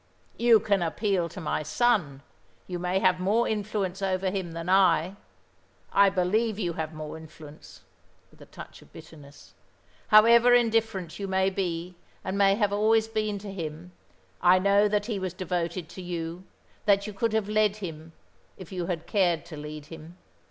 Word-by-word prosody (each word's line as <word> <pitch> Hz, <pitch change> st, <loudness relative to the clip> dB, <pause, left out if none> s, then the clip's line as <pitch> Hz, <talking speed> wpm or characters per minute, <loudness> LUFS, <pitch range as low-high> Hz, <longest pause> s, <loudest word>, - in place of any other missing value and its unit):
"You 235 Hz, -2 st, +6 dB
can 200 Hz, -2 st, 0 dB
appeal 175 Hz, +1 st, -1 dB
to -, -, -9 dB
my 155 Hz, -2 st, -2 dB
son. 155 Hz, -, 0 dB, 0.4 s
You 180 Hz, -1 st, -5 dB
may 180 Hz, +1 st, -1 dB
have 185 Hz, -1 st, +2 dB
more 210 Hz, +6 st, +1 dB
influence 205 Hz, -3 st, -3 dB
over 190 Hz, -1 st, -1 dB
him 185 Hz, -4 st, -4 dB
than 165 Hz, +1 st, -6 dB
I. 185 Hz, -1 st, +3 dB, 0.8 s
I 200 Hz, 0 st, +6 dB
believe 200 Hz, +4 st, 0 dB
you 175 Hz, -5 st, -2 dB
have 160 Hz, -1 st, -4 dB
more 155 Hz, 0 st, -7 dB
influence," 150 Hz, -, -14 dB, 0.5 s
with -, -, -22 dB
a -, -, -13 dB
touch -, -, -12 dB
of -, -, -20 dB
bitterness. 145 Hz, -2 st, -15 dB, 0.5 s
"However 235 Hz, +3 st, +7 dB
indifferent 225 Hz, -7 st, 0 dB
you 200 Hz, -, -4 dB
may 190 Hz, 0 st, +1 dB
be, 180 Hz, -2 st, -3 dB, 0.3 s
and 190 Hz, -, -3 dB
may 195 Hz, 0 st, +4 dB
have 205 Hz, -2 st, 0 dB
always 220 Hz, +2 st, +2 dB
been 215 Hz, -2 st, -2 dB
to 200 Hz, -, -6 dB
him, 165 Hz, 0 st, -7 dB, 0.5 s
I 180 Hz, +1 st, +6 dB
know 200 Hz, +2 st, +3 dB
that 205 Hz, 0 st, 0 dB
he 215 Hz, -3 st, -3 dB
was 185 Hz, -1 st, -4 dB
devoted 175 Hz, -1 st, -3 dB
to 185 Hz, -, -9 dB
you, 175 Hz, 0 st, -5 dB, 0.4 s
that 200 Hz, -1 st, +3 dB
you 210 Hz, -, -6 dB
could 220 Hz, +3 st, -1 dB
have 220 Hz, -2 st, 0 dB
led 210 Hz, -1 st, +2 dB
him, 165 Hz, -5 st, -8 dB, 0.4 s
if 185 Hz, -2 st, -11 dB
you 180 Hz, -2 st, -4 dB
had 170 Hz, -3 st, -3 dB
cared 175 Hz, -5 st, +1 dB
to 170 Hz, -2 st, -10 dB
lead 150 Hz, 0 st, -8 dB
him. 165 Hz, +2 st, -12 dB
185 Hz, 175 wpm, -27 LUFS, 170-210 Hz, 0.8 s, However